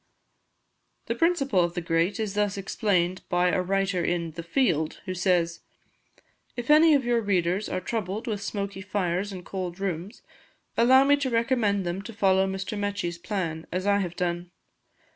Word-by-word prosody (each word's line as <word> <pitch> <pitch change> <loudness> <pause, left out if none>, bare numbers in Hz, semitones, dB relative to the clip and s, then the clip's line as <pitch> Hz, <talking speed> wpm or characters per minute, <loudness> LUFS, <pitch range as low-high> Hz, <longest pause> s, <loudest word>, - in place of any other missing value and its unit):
The - - -1
principle 300 - +2
of 170 0 -2
the - - 0
grate 165 +5 0
is 215 -3 -2
thus 205 -1 0
explained 185 -2 0
by 180 0 +2
a 185 - +1
writer 195 -1 0
in 170 -1 -1
'The 170 - -7
Field', 165 - 0
who 185 - -3
says: 175 -2 +1 1.0
"If 240 +4 -1
any 310 0 +7
of 270 -3 +1
your 240 -1 +2
readers 190 -1 0
are 185 - -1
troubled 210 0 -3
with 210 -4 -3
smoky 200 -1 -4
fires 190 -1 -1
and 180 -2 -8
cold 185 -2 -5
rooms, 195 +2 -4 0.5
allow 260 +3 +6
me 285 +1 +4
to 280 -2 -1
recommend 230 -5 +1
them 175 +2 -2
to 230 +3 -9
follow 190 -2 +3
Mr. 190 +2 -4
Mechi's 205 -4 -3
plan, 170 -4 -3
as 185 +2 -2
I 200 0 +3
have 175 -3 -3
done. 175 0 -2
195 Hz, 170 wpm, -26 LUFS, 175-215 Hz, 1.0 s, any